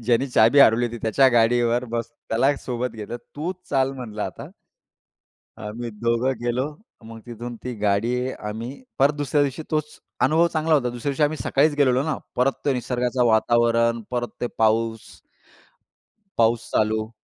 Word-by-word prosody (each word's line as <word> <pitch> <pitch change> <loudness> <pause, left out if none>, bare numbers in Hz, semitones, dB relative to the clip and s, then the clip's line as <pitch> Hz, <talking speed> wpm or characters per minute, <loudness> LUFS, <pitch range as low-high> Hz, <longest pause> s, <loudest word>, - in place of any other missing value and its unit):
ज्यांनी 120 +3 +2
चाबी 115 +3 +4
हरवली 120 -1 +5
होती 120 0 -6
त्याच्या 130 +4 +4
गाडीवर 120 +1 +2
बसून 115 0 -5
त्याला 135 +6 +3
सोबत 125 -1 -3
घेतलं. 110 +2 -6 0.2
"तूच 170 +5 -4
चाल 135 -1 +1
म्हणलं 110 -5 -6
आता." - - -6 1.1
आम्ही 115 +2 -6
दोघं 115 +4 0
गेलो 120 +3 0 0.4
मग 115 0 -10
तिथून 120 +1 -7
ती 125 -1 -4
गाडी 105 +3 +1 0.2
आम्ही 110 +4 -6 0.3
परत 140 +2 +4
दुसऱ्या 145 0 +1
दिवशी 140 +2 -2
तोच 155 -1 -2 0.2
अनुभव 165 +2 +4
चांगला 160 0 +2
होता. 125 -4 +2
दुसऱ्या 120 +4 -3
दिवशी 145 - -1
आम्ही 150 +1 +2
सकाळीच 145 +2 +2
गेलेलो 130 -2 +3
ना 155 -1 -1 0.2
परत 130 +2 +3
ते 140 - +2
निसर्गाचं 125 0 -1
वातावरण 115 +1 +3
परत 120 -1 -2
ते 120 - 0
पाऊस. 110 0 +1 1.3
पाऊस 115 0 +2
चालू. 110 +1 0
120 Hz, 155 wpm, -23 LUFS, 115-135 Hz, 1.3 s, हरवली